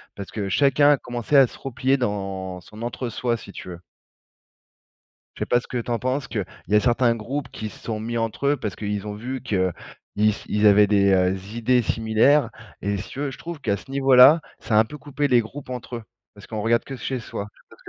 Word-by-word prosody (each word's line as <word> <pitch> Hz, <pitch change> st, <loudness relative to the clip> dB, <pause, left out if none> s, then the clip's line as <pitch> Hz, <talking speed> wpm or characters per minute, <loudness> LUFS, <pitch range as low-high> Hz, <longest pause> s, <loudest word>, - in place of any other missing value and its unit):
parce 100 Hz, -, -8 dB
que 105 Hz, -3 st, -3 dB
chacun 145 Hz, +6 st, +4 dB
a 145 Hz, -, +4 dB
commencé 120 Hz, +3 st, -3 dB
à 135 Hz, -2 st, +8 dB
se -, -, -14 dB
replier 135 Hz, +1 st, 0 dB
dans 95 Hz, -5 st, -3 dB
son 105 Hz, +6 st, -13 dB
entre-soi, 120 Hz, 0 st, -2 dB
si 105 Hz, -, -10 dB
tu -, -, -10 dB
veux 90 Hz, -1 st, -8 dB, 1.6 s
je -, -, -13 dB
sais -, -, 0 dB
pas 120 Hz, -, +3 dB
ce -, -, -15 dB
que -, -, -6 dB
tu 120 Hz, -, -6 dB
en 120 Hz, -, +1 dB
penses 130 Hz, +3 st, -2 dB
qu'il 105 Hz, -4 st, -2 dB, 0.2 s
y 105 Hz, -, +1 dB
a 105 Hz, -, +6 dB
certains 120 Hz, 0 st, +3 dB
groupes 125 Hz, +5 st, -4 dB
qui 110 Hz, -, -6 dB
se 100 Hz, -, -13 dB
sont 110 Hz, -2 st, -4 dB
mis 115 Hz, +2 st, -3 dB
entre 115 Hz, +4 st, -2 dB
eux, 145 Hz, -, +3 dB
parce 105 Hz, -6 st, -5 dB
qu'ils 105 Hz, -1 st, -3 dB
ont 105 Hz, -, -4 dB
vu 125 Hz, +5 st, -5 dB
qu'ils 95 Hz, -3 st, 0 dB, 0.4 s
s 105 Hz, 0 st, +1 dB
ils 105 Hz, +1 st, +2 dB
avaient 105 Hz, 0 st, +7 dB
des, 100 Hz, -1 st, +3 dB
heu, 95 Hz, 0 st, +3 dB, 0.2 s
idées 120 Hz, +1 st, +2 dB
similaires 115 Hz, +7 st, +3 dB, 0.3 s
et 100 Hz, 0 st, -1 dB
si 100 Hz, -, -6 dB
tu 135 Hz, -, -7 dB
veux, 145 Hz, -1 st, -1 dB
je 125 Hz, -, -10 dB
trouve 170 Hz, -3 st, -7 dB
qu'à 100 Hz, -5 st, 0 dB
ce 135 Hz, -, -13 dB
niveau 135 Hz, -1 st, +3 dB
là, 135 Hz, +6 st, +9 dB, 0.2 s
ça 110 Hz, -, -1 dB
a -, -, +8 dB
un 110 Hz, -, +6 dB
peu 150 Hz, +7 st, -10 dB
coupé 145 Hz, 0 st, -2 dB
les 125 Hz, -3 st, +5 dB
groupes 130 Hz, +4 st, -8 dB
entre 125 Hz, -1 st, -5 dB
eux. 115 Hz, -, -7 dB, 0.3 s
Parce -, -, -14 dB
qu'on 110 Hz, -, -4 dB
regarde 115 Hz, +1 st, +2 dB
que 135 Hz, -, -7 dB
chez 130 Hz, +2 st, -3 dB
soi. 105 Hz, -2 st, -6 dB
Je -, -, -41 dB
sais -, -, -65 dB
pas -, -, -16 dB
ce -, -, -22 dB
115 Hz, 250 wpm, -23 LUFS, 105-130 Hz, 1.6 s, là